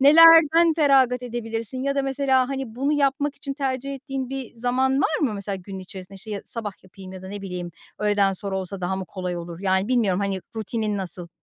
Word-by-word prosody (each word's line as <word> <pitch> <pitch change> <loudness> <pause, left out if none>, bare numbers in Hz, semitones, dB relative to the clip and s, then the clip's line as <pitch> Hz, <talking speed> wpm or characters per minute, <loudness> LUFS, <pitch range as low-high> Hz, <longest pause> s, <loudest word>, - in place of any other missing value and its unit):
nelerden 330 +2 +8
feragat 265 -5 +4
edebilirsin 235 +1 -4
ya 280 0 0
da 275 - +1
mesela 270 -1 +2
hani, 265 -5 -4
bunu 275 +4 0
yapmak 285 0 +1
için 275 -1 -5
tercih 275 -1 -2
ettiğin 270 -1 -5
bir 270 -3 -6
zaman 250 +3 +1
var 310 - +1
mı? 250 -8 +1
Mesela, 200 -1 -3
günün 190 +1 -8
içerisinde, 190 0 -9
şey, 205 +1 -5
sabah 220 -4 -4
yapayım 190 0 -12
ya 185 0 -9
da 190 - -8
ne 200 0 -6
bileyim, 180 -2 -5 0.3
öğleden 205 -2 +2
sonra 190 0 -3
olsa 190 +1 -6
daha 180 +1 -1
mı 190 - -4
kolay 180 -1 -4
olur? 170 -1 -7
Yani, 190 +2 +1
bilmiyorum 210 -7 +2
hani, 195 -1 -1 0.2
rutinin 215 -1 -2
nasıl? 175 -2 -3
225 Hz, 200 wpm, -24 LUFS, 190-270 Hz, 0.3 s, nelerden